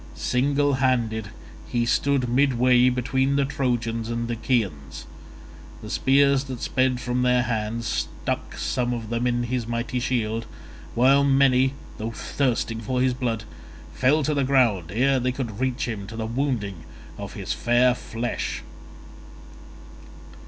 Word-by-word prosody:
Single 140 Hz, +3 st, +1 dB
handed 120 Hz, -5 st, 0 dB, 0.4 s
he 120 Hz, -1 st, 0 dB
stood 135 Hz, +1 st, +1 dB
midway 125 Hz, -1 st, +4 dB
between 130 Hz, +2 st, 0 dB
the 140 Hz, -1 st, +2 dB
Trojans 120 Hz, -4 st, -1 dB
and 115 Hz, 0 st, -2 dB
Achaeans: 100 Hz, -, -2 dB, 0.8 s
the -, -, -7 dB
spears 140 Hz, 0 st, +3 dB
that 130 Hz, -3 st, -6 dB
sped 130 Hz, 0 st, +1 dB
from 125 Hz, 0 st, -1 dB
their 125 Hz, 0 st, +3 dB
hands 115 Hz, 0 st, -2 dB, 0.4 s
stuck -, -, -2 dB
some 125 Hz, -1 st, -1 dB
of 115 Hz, -1 st, -6 dB
them 120 Hz, +1 st, 0 dB
in 120 Hz, 0 st, 0 dB
his 120 Hz, -1 st, -2 dB
mighty 120 Hz, +1 st, -2 dB
shield, 115 Hz, -3 st, -1 dB, 0.5 s
while 135 Hz, +4 st, +5 dB
many, 135 Hz, -1 st, +3 dB, 0.2 s
though 110 Hz, +1 st, -3 dB
thirsting 115 Hz, -1 st, -1 dB
for 125 Hz, +3 st, -2 dB
his 130 Hz, 0 st, +2 dB
blood, 120 Hz, -4 st, -2 dB, 0.5 s
fell 145 Hz, +4 st, +3 dB
to 150 Hz, -, 0 dB
the 140 Hz, -1 st, +1 dB
ground 115 Hz, -, +2 dB
ere 130 Hz, +5 st, +2 dB
they 125 Hz, +1 st, 0 dB
could 120 Hz, -5 st, -5 dB
reach 130 Hz, -1 st, -1 dB
him 105 Hz, -4 st, -5 dB
to 110 Hz, -, -8 dB
the 110 Hz, 0 st, -3 dB
wounding 115 Hz, -5 st, -2 dB, 0.4 s
of -, -, -6 dB
his -, -, -3 dB
fair 120 Hz, +1 st, +3 dB
flesh. 120 Hz, -1 st, -4 dB
125 Hz, 140 wpm, -24 LUFS, 115-130 Hz, 0.8 s, while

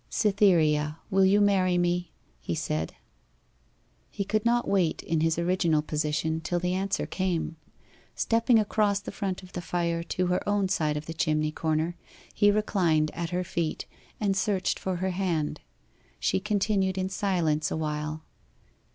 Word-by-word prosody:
'Cytherea, 165 Hz, -8 st, +3 dB
will 190 Hz, 0 st, +5 dB
you 200 Hz, +2 st, +5 dB
marry 190 Hz, -3 st, +3 dB
me?' 175 Hz, -1 st, 0 dB, 0.3 s
he -, -, -3 dB
said. 80 Hz, +1 st, -2 dB, 1.1 s
He 200 Hz, -, -3 dB
could 215 Hz, +2 st, 0 dB
not 240 Hz, +1 st, +2 dB
wait 185 Hz, -5 st, +1 dB
in 160 Hz, -1 st, 0 dB
his 160 Hz, 0 st, +2 dB
original 170 Hz, -3 st, +2 dB
position 155 Hz, +1 st, -1 dB
till 175 Hz, +2 st, -1 dB
the 180 Hz, +1 st, -1 dB
answer 195 Hz, +1 st, -1 dB
came. 180 Hz, -4 st, -2 dB, 0.6 s
Stepping 230 Hz, +1 st, +3 dB
across 210 Hz, -1 st, +2 dB
the -, -, -7 dB
front 195 Hz, -3 st, -3 dB
of 180 Hz, -, -13 dB
the 175 Hz, -, -4 dB
fire 170 Hz, 0 st, -1 dB
to 180 Hz, +2 st, -2 dB
her 180 Hz, 0 st, +1 dB
own 205 Hz, -2 st, +1 dB
side 155 Hz, -5 st, 0 dB
of 150 Hz, -, -5 dB
the 165 Hz, -, -5 dB
chimney 155 Hz, -1 st, 0 dB
corner, 160 Hz, +2 st, -1 dB, 0.4 s
he 205 Hz, -, +4 dB
reclined 175 Hz, -7 st, +2 dB
at 170 Hz, -1 st, -3 dB
her 180 Hz, +1 st, -1 dB
feet, 165 Hz, -2 st, -2 dB, 0.3 s
and 200 Hz, -2 st, +1 dB
searched 195 Hz, -1 st, 0 dB
for 190 Hz, -1 st, -2 dB
her 185 Hz, +2 st, -1 dB
hand. 175 Hz, -5 st, -1 dB, 0.6 s
She 95 Hz, -, +1 dB
continued 195 Hz, -, 0 dB
in 185 Hz, 0 st, 0 dB
silence 170 Hz, -6 st, 0 dB
awhile. 155 Hz, 0 st, -3 dB
180 Hz, 155 wpm, -27 LUFS, 160-195 Hz, 1.1 s, will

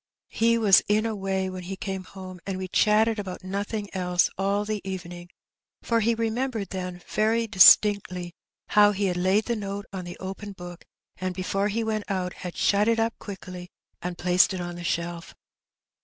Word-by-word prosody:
He 230 Hz, +1 st, +2 dB
Wds 205 Hz, -4 st, +6 dB
in 215 Hz, +2 st, +2 dB
a 225 Hz, -1 st, -1 dB
way 190 Hz, -1 st, -1 dB
when 185 Hz, -1 st, -6 dB
he 185 Hz, +2 st, -6 dB
came 190 Hz, -2 st, -5 dB
home, 185 Hz, -1 st, -10 dB
and 195 Hz, -1 st, -2 dB
we 185 Hz, 0 st, -4 dB
chatted 215 Hz, +3 st, +3 dB
about 185 Hz, -3 st, -6 dB
nothing 200 Hz, +2 st, -3 dB
else 180 Hz, -1 st, +1 dB
all 200 Hz, +2 st, 0 dB
the 215 Hz, -1 st, -3 dB
evening, 175 Hz, -2 st, -7 dB, 0.5 s
for 230 Hz, -1 st, +1 dB
he 230 Hz, +1 st, +2 dB
remembered 225 Hz, -1 st, -2 dB
then 180 Hz, -2 st, -5 dB
very 225 Hz, +2 st, +1 dB
distinctly 185 Hz, -3 st, +5 dB, 0.4 s
how 210 Hz, 0 st, +5 dB
he 200 Hz, +1 st, -1 dB
had 180 Hz, -2 st, 0 dB
laid 190 Hz, +4 st, +2 dB
the 235 Hz, -, -1 dB
note 200 Hz, -1 st, -5 dB
on 185 Hz, -2 st, -5 dB
the 175 Hz, -, -8 dB
open 195 Hz, +2 st, -7 dB
book, 175 Hz, -2 st, -10 dB, 0.3 s
and 185 Hz, -1 st, -3 dB
before 195 Hz, +2 st, -1 dB
he 225 Hz, +2 st, -1 dB
went 215 Hz, -1 st, -3 dB
out 185 Hz, -2 st, -2 dB
had 180 Hz, -1 st, -8 dB
shut 205 Hz, +1 st, +3 dB
it 230 Hz, 0 st, +2 dB
up 225 Hz, +1 st, +1 dB
quickly, 185 Hz, -3 st, -8 dB, 0.3 s
and 175 Hz, 0 st, -4 dB
placed 180 Hz, +2 st, +3 dB
it -, -, -4 dB
on 175 Hz, 0 st, -4 dB
the 175 Hz, 0 st, -8 dB
shelf. 170 Hz, -1 st, -3 dB
195 Hz, 185 wpm, -26 LUFS, 180-210 Hz, 0.5 s, Wds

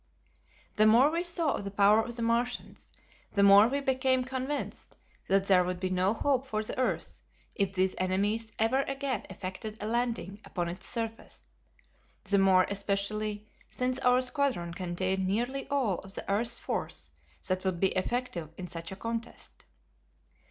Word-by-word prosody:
The 215 Hz, +1 st, +6 dB
more 245 Hz, +7 st, +6 dB
we 335 Hz, +1 st, 0 dB
saw 345 Hz, -4 st, 0 dB
of -, -, -4 dB
the 200 Hz, -, -4 dB
power 205 Hz, +2 st, +5 dB
of 235 Hz, 0 st, -6 dB
the 235 Hz, -, -3 dB
Martians, 235 Hz, +2 st, -2 dB, 0.4 s
the 200 Hz, -, +3 dB
more 200 Hz, +2 st, +8 dB
we 280 Hz, +3 st, -1 dB
became 260 Hz, -1 st, +2 dB
convinced 265 Hz, +3 st, -4 dB, 0.3 s
that 195 Hz, 0 st, +3 dB
there 185 Hz, -2 st, +5 dB
would 180 Hz, 0 st, -3 dB
be 185 Hz, 0 st, -2 dB
no 185 Hz, +3 st, +2 dB
hope 270 Hz, +1 st, 0 dB
for 215 Hz, -3 st, -2 dB
the -, -, -4 dB
earth, 255 Hz, -, -1 dB, 0.3 s
if 195 Hz, -2 st, 0 dB
these 190 Hz, 0 st, +1 dB
enemies 205 Hz, +4 st, 0 dB
ever 230 Hz, +5 st, +2 dB
again 275 Hz, -4 st, -3 dB
effected 190 Hz, +3 st, -6 dB
a -, -, -4 dB
landing 225 Hz, -3 st, -2 dB
upon 175 Hz, -2 st, -3 dB
its 175 Hz, -, -4 dB
surface, 225 Hz, -1 st, -4 dB, 0.8 s
the 200 Hz, 0 st, +2 dB
more 190 Hz, -1 st, +5 dB
especially 205 Hz, +1 st, -1 dB, 0.2 s
since 255 Hz, 0 st, -2 dB
our 250 Hz, 0 st, +4 dB
squadron 255 Hz, -, 0 dB
contained 185 Hz, +1 st, -1 dB
nearly 245 Hz, +7 st, -1 dB
all 255 Hz, -10 st, +1 dB
of 195 Hz, +1 st, -10 dB
the -, -, -6 dB
earth's 230 Hz, +4 st, +1 dB
force -, -, -4 dB, 0.4 s
that 185 Hz, 0 st, -1 dB
would 185 Hz, -3 st, -1 dB
be 190 Hz, -, +3 dB
effective 185 Hz, -5 st, -2 dB
in 185 Hz, -, -5 dB
such 165 Hz, -1 st, -6 dB
a -, -, -5 dB
contest. 230 Hz, +3 st, -6 dB
215 Hz, 165 wpm, -30 LUFS, 190-250 Hz, 0.8 s, more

